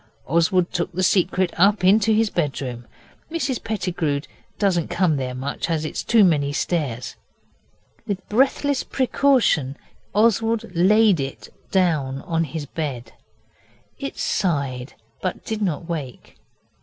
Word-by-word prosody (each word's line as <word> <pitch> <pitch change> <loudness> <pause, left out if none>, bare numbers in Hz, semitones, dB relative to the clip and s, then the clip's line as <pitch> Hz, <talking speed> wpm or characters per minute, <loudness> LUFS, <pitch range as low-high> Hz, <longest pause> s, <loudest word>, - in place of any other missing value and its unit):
Oswald 170 +3 +2
took 175 -2 -1
the 185 +2 -1
Secret 185 -1 +2
up 200 +2 +4
into 210 +4 +5
his 220 0 +2
bedroom. 135 -7 -3 0.4
Mrs 285 -7 -2
Pettigrew 175 -9 -1 0.4
doesn't 180 -6 +1
come 175 -3 +1
there 130 -1 -3
much, 140 +6 -4
it's 155 -2 -2
too 230 -3 +5
many 145 -6 +3
stairs. 145 -6 -2 0.9
With 195 -2 -4
breathless 270 +4 +2
precaution 250 - +2 0.4
Oswald 225 +1 +2
laid 200 +1 +5
it 135 0 -5 0.2
down 150 -8 +1
on 165 -3 0
his 155 0 -5
bed. 130 -6 -5 0.9
It - - -5
sighed, 140 -7 -1 0.3
but 185 - -3
did 220 -1 -3
not 170 -4 -2
wake. 150 -8 -6
175 Hz, 120 wpm, -22 LUFS, 145-205 Hz, 0.9 s, into